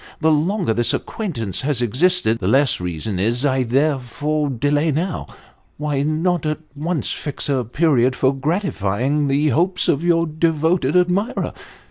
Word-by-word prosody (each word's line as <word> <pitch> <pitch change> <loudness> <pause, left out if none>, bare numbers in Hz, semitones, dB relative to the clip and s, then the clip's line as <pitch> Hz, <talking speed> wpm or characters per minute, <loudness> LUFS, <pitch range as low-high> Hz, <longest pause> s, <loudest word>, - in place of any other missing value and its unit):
The 160 0 +3
longer 165 - +1
this 120 +1 +1
acquaintance 115 - -4
has 140 -2 -1
existed, 125 - +1
the 90 - -2
less 135 0 +3
reason 90 +3 -3
is 115 +6 +1
there 135 +2 +1
for 145 +4 -2
delay 145 +5 +1
now. 165 +3 -2 0.5
Why 150 -2 -1
not 160 +3 0
at 155 - -1 0.2
once 160 +2 -2
fix 145 -3 -4
a 135 -3 +1
period 130 0 +2
for 130 +1 +2
gratifying 140 - -1
the 145 +2 +2
hopes 180 +7 +1
of 145 +3 +1
your 170 -1 +3
devotod 160 -1 0
admirer? 180 +4 +1
145 Hz, 145 wpm, -20 LUFS, 125-165 Hz, 0.5 s, The